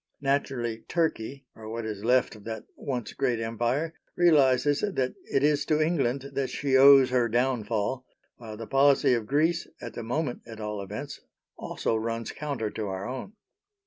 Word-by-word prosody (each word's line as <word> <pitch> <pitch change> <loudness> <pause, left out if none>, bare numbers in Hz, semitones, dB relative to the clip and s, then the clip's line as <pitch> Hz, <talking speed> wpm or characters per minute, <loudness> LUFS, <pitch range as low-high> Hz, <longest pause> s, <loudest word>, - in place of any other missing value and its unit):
Naturally, 135 -5 -1
Turkey 140 -5 -1
or 110 -1 -9
what 115 0 -4
is 105 -2 -5
left 125 0 +2
of 105 - -14
that 110 -1 -5
once 125 -4 -4
great 125 -4 0
Empire 120 +8 -1 0.2
realises 145 -4 +4
that 135 -11 -1
it 135 - 0
is 150 -1 +3
to 155 -1 +2
England 140 -4 0
that 135 -1 -1
she 140 -2 0
owes 135 -1 +8
her 125 -2 +2
downfall, 120 0 0 0.3
while 110 -3 -9
the 115 - -6
policy 135 +1 +4
of 115 -3 -1
Greece, 160 +5 +1
at - - -7
the - - -5
moment 125 +3 -2
at 110 -1 -9
all 105 -1 -4
events, 105 +9 -7 0.3
also - - -2
runs 115 +1 -3
counter 140 -8 -3
to 110 -2 -4
our 95 +1 -4
own. 130 - -6
125 Hz, 170 wpm, -27 LUFS, 115-140 Hz, 0.3 s, owes